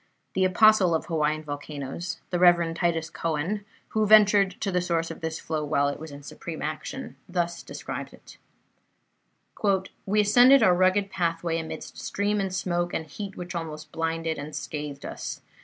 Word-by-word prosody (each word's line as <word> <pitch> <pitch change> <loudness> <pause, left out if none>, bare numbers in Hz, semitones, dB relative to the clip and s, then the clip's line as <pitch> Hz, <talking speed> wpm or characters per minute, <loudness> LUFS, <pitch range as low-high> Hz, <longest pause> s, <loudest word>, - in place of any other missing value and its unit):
The 190 - +2
Apostle 185 -2 +5
of 160 - -2
Hawaiian 155 -1 0
volcanoes, 145 +2 -5
the 175 - 0
Rev. 175 -2 +5
Titus 165 -1 -1
Coan, 165 +6 -2 0.3
who 215 -1 +1
ventured 205 -3 +6
to 200 - 0
the 180 -1 +1
source 165 -2 -1
of - - -9
this 160 0 -3
flow 155 -1 -3
while 145 -1 +2
it 145 - -5
was 160 +1 -8
in 140 0 -10
supreme 160 +2 -7
action, 155 -3 -5
thus 175 -1 -1
describes - - -6
it: - - -15 1.7
"We 210 +2 +4
ascended 245 +6 +7
our 180 - +6
rugged 185 +2 +2
pathway 165 -1 -1
amidst 160 - -7
steam 205 +1 -1
and 195 -1 -1
smoke 175 -2 -1
and 160 - -2
heat 195 +5 -7
which 180 0 -6
almost 155 -3 -6
blinded 165 -1 -2
and 150 +1 -7
scathed 145 -2 -5
us. - - -6
170 Hz, 165 wpm, -26 LUFS, 155-190 Hz, 1.7 s, ascended